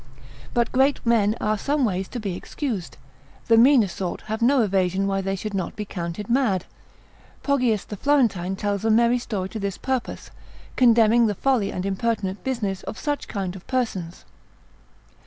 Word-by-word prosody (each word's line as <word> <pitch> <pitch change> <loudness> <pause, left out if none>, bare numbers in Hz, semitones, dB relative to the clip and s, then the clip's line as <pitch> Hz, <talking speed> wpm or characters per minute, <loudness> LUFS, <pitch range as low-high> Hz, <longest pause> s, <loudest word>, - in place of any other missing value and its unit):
But 235 -1 +1
great 270 +2 +3
men 220 -2 +3
are 215 0 0
some 285 +1 +1
ways 190 -3 -1
to 245 - -6
be 200 -5 -3
excused, 215 - -5 0.5
the 230 - +4
meaner 240 -1 +6
sort 180 0 -4
have 220 +2 -5
no 255 +1 +4
evasion 190 -1 +1
why 195 0 0
they 195 0 -2
should 210 +2 -5
not 190 -2 -3
be 210 - -4
counted 175 +1 -5
mad. 235 -7 +1 0.8
Poggius 250 -7 +1
the 210 - -7
Florentine 215 -10 +1
tells 200 0 -2
a 225 - +1
merry 235 +2 +4
story 195 -6 -4
to 220 - -6
this 200 -1 -3
purpose, 260 -2 -3 0.4
condemning 230 -1 +5
the 205 - -1
folly 250 -3 +1
and 185 - -4
impertinent 195 -1 -2
business 215 -8 -2
of - - -7
such 290 -1 -3
kind 195 -3 -4
of 190 - -12
persons. 195 -10 -3
215 Hz, 170 wpm, -24 LUFS, 195-240 Hz, 0.8 s, meaner